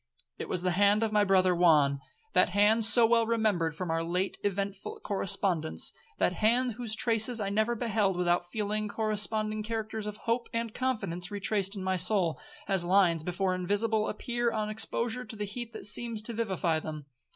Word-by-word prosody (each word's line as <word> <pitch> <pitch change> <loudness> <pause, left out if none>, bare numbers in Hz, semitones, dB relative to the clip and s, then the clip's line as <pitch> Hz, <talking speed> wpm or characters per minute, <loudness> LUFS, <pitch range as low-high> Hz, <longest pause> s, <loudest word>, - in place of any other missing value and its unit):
It - - -6
was 180 -1 -2
the 180 - +1
hand 205 +4 +3
of 220 - -1
my 210 -1 +3
brother 185 -2 +3
Juan, 150 -5 +3 0.3
that - - +4
hand 210 +4 +3
so 230 +1 +6
well 230 0 +3
remembered 210 -9 0
from 180 0 -4
our 165 0 -1
late 180 +3 -2
eventful 200 0 -3
correspondence,—that 180 - 0
hand 240 +6 +2
whose 225 -1 -4
traces 225 +1 +2
I 200 -2 -2
never 220 +4 0
beheld 215 -5 0
without 175 0 0
feeling 215 +1 -2
corresponding 215 0 -1
characters 220 -1 -4
of 210 0 -6
hope 235 +1 -1
and 230 -1 -3
confidence 195 -9 -3
retraced 200 0 -1
in 195 - -5
my 190 0 0
soul, 180 -2 +3 0.3
as 195 -3 +2
lines 175 -3 +3
before 180 +3 -1
invisible 205 +4 0
appear 240 +2 -2
on 215 -1 -2
exposure 235 +3 -1
to 240 - -8
the 210 -1 -4
heat 230 +3 -7
that - - -8
seems 225 0 -2
to 235 - -3
vivify 190 -7 -1
them. 155 -2 -7
205 Hz, 175 wpm, -29 LUFS, 180-220 Hz, 0.3 s, so